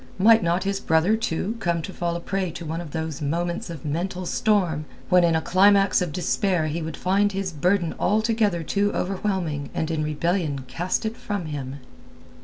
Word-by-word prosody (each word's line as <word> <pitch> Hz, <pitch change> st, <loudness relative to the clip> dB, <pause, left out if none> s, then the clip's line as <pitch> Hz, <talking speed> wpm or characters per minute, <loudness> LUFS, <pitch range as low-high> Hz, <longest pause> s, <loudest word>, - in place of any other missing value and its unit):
Might 225 Hz, +4 st, +6 dB
not 170 Hz, +1 st, +1 dB
his 200 Hz, 0 st, -1 dB
brother, 160 Hz, +7 st, +3 dB
too, 220 Hz, 0 st, -2 dB
come 170 Hz, -5 st, 0 dB
to 190 Hz, -, -6 dB
fall 170 Hz, -1 st, -2 dB
a -, -, -2 dB
prey 190 Hz, +1 st, -2 dB
to 170 Hz, -1 st, -7 dB
one 160 Hz, +2 st, -3 dB
of 170 Hz, -, -8 dB
those 160 Hz, -1 st, -4 dB
moments 170 Hz, +4 st, -2 dB
of 160 Hz, -5 st, -8 dB
mental 180 Hz, +5 st, -2 dB
storm 175 Hz, -7 st, +1 dB, 0.2 s
when 180 Hz, -1 st, +5 dB
in 165 Hz, -1 st, +3 dB
a 160 Hz, -, +1 dB
climax 195 Hz, +1 st, +4 dB
of 175 Hz, -3 st, -1 dB
despair 180 Hz, +1 st, 0 dB
he 155 Hz, +2 st, -2 dB
would 160 Hz, 0 st, -5 dB
find 200 Hz, +2 st, +2 dB
his 190 Hz, -2 st, -3 dB
burden 175 Hz, +3 st, +1 dB
altogether 215 Hz, -3 st, +1 dB
too 200 Hz, +5 st, +1 dB
overwhelming 180 Hz, -6 st, -2 dB
and 160 Hz, 0 st, -1 dB
in 155 Hz, -1 st, -1 dB
rebellion 155 Hz, -1 st, -1 dB
cast 180 Hz, +5 st, -2 dB
it 220 Hz, +1 st, -2 dB
from 205 Hz, -7 st, -4 dB
him? 140 Hz, -2 st, -5 dB
175 Hz, 190 wpm, -24 LUFS, 160-195 Hz, 0.2 s, Might